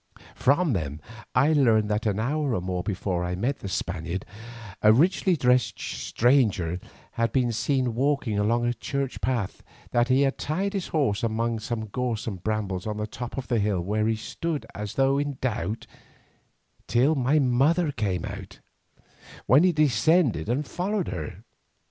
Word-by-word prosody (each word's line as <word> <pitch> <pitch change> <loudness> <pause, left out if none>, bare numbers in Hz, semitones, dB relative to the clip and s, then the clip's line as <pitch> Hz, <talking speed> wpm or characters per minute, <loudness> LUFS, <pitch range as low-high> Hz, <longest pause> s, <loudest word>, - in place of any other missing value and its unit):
From 145 +2 +2
them 75 -6 -3 0.4
I 140 +6 +4
learned 115 -7 +4
that 105 +2 0
an 105 0 0
hour 140 +2 0
or 90 - -1
more 90 0 -2
before 90 -2 -2
I 90 0 -2
met 125 +9 -1
the - - -6
Spaniard, 85 0 -3 0.6
a 105 - +7
richly 175 - +3
dressed 125 -2 +2
stranger 110 - +1 0.3
had 115 -1 0
been 125 -2 +1
seen 125 +1 0
walking 130 -4 0
along 115 +3 +2
the 120 - +1
church 135 +1 -4
path, 120 -7 -2
and - - -25
that 120 0 +3
he 130 +1 +3
had 140 -1 +1
tied 190 +7 -1
his 195 -3 -2
horse 135 -11 0
among 115 0 -1
some 110 0 -3
gorse 120 +1 -3
and 95 -6 -5
brambles 105 -3 -2
on 105 -1 -3
the 105 - -2
top 120 +4 -7
of 130 - -4
the 120 - +1
hill, 100 -2 +1
where 105 +5 0
he 115 - +2
stood 155 +7 -4
as 105 0 -6
though 135 +1 +3
in 145 -2 -2
doubt, 115 -3 -2 1.0
till 130 +6 +3
my 135 +1 +2
mother 145 +5 +3
came 95 -9 -2
out, - - -8 0.9
when 135 +6 +6
he 185 - +5
descended 150 - +2
and 135 +5 0
followed 190 +4 -2
her. 80 -4 -6
120 Hz, 170 wpm, -26 LUFS, 105-140 Hz, 1.0 s, a